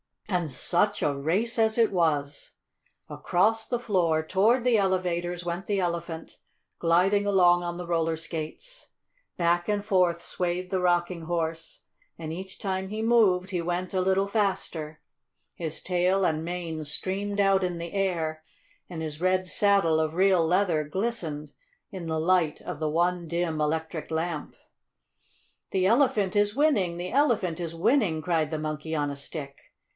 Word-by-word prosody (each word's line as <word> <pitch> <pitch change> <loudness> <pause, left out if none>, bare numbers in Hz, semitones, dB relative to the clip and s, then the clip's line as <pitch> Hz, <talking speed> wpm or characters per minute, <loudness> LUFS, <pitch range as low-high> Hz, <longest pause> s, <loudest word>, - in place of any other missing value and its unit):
And 180 -6 -1
such 180 +9 +1
a 145 -1 +1
race 195 - 0
as 220 0 +3
it 230 -2 +4
was! 150 -6 0 0.6
Across 220 +5 +1
the 245 - 0
floor, 175 -9 +1
toward 220 +8 +3
the 245 -2 +4
elevators, 180 -3 0
went 175 +2 -4
the 200 -2 0
Elephant, 170 -2 -4 0.4
gliding 185 +5 +3
along 175 -3 +4
on 175 0 -4
the 180 - -5
roller 165 -1 0
skates. 165 - -7 0.5
Back 175 0 +1
and 205 -1 -1
forth 180 -4 +2
swayed 180 +1 -3
the 190 - +1
Rocking 175 -1 +1
Horse, 165 -1 -3 0.4
and 160 -1 -6
each 190 +2 -7
time 190 -1 -2
he 215 +3 -4
moved 205 -6 +3
he 180 -2 -1
went 175 +2 -3
a 185 - +1
little 190 +1 +2
faster. 185 -7 -2 0.5
His 160 -2 -4
tail 185 +1 +2
and 160 -1 0
mane 170 -3 -4
streamed 200 +6 -1
out 195 -1 +3
in 180 -1 -1
the 170 0 -6
air 170 -5 -1 0.5
and 170 -3 -6
his 155 0 -6
red 185 0 +2
saddle 195 -5 +3
of 155 0 -1
real 185 -2 +4
leather 175 -4 +2
glistened 160 -4 -3 0.4
in 185 -4 -6
the 160 -1 -1
light 165 -2 +2
of 175 -5 -6
the 155 -1 -1
one 175 +2 0
dim 170 -1 -1
electric 160 +1 -2
lamp. 160 -1 -3 1.2
"The 185 -1 +1
Elephant 215 -4 +2
is 205 +1 +2
winning! 225 - +2
The 180 +1 -5
Elephant 235 - +1
is 165 -1 -4
winning!" 175 - +2
cried 160 -3 0
the 155 - -2
Monkey 155 +1 -4
on 145 -1 0
a - - -5
Stick. 140 0 -6
175 Hz, 160 wpm, -27 LUFS, 160-195 Hz, 1.2 s, it